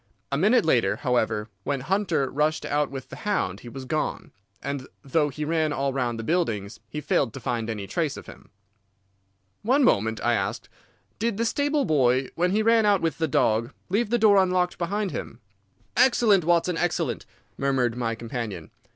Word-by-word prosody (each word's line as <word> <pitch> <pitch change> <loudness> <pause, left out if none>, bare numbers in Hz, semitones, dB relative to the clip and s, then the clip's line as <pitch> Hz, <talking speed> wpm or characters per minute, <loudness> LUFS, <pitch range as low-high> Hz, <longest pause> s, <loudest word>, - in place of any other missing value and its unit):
A 140 - +1
minute 215 +4 +4
later, 120 -10 +3
however, 110 -4 0 0.2
when 140 +1 -2
Hunter 175 -3 0
rushed 150 +3 0
out 145 0 0
with 135 -2 -8
the - - -9
hound 145 - -1
he 120 - -10
was 130 +2 -8
gone, 155 +4 -2 0.3
and 140 -2 -5 0.2
though 150 +2 +1
he 150 +2 -4
ran 160 -1 +1
all 140 -2 -1
round 120 -3 -1
the 115 - -5
buildings 115 - -1
he 150 - -4
failed 115 -5 0
to - - -5
find 115 -2 -2
any 105 -3 -4
trace 155 - -2
of - - -9
him." - - -14 1.1
"One 265 +6 +3
moment," 110 - +2
I 120 +1 +3
asked. 95 -4 -2 0.5
"Did 225 -1 0
the 230 - 0
stable 285 +3 +1
boy, 130 - +2
when 180 +2 +1
he 210 +3 +1
ran 230 0 +4
out 205 -3 +3
with 165 -2 -1
the 160 - +1
dog, 115 -3 +1 0.2
leave 205 +4 +1
the 240 - +2
door 210 -3 +5
unlocked 180 -1 0
behind 200 +3 -1
him?" 115 - -6 0.6
"Excellent, 235 -8 +4
Watson, 175 0 +2
excellent!" 175 0 -1 0.3
murmured 130 -4 0
my 115 -2 -2
companion. 115 -7 -6
150 Hz, 180 wpm, -25 LUFS, 120-190 Hz, 1.1 s, door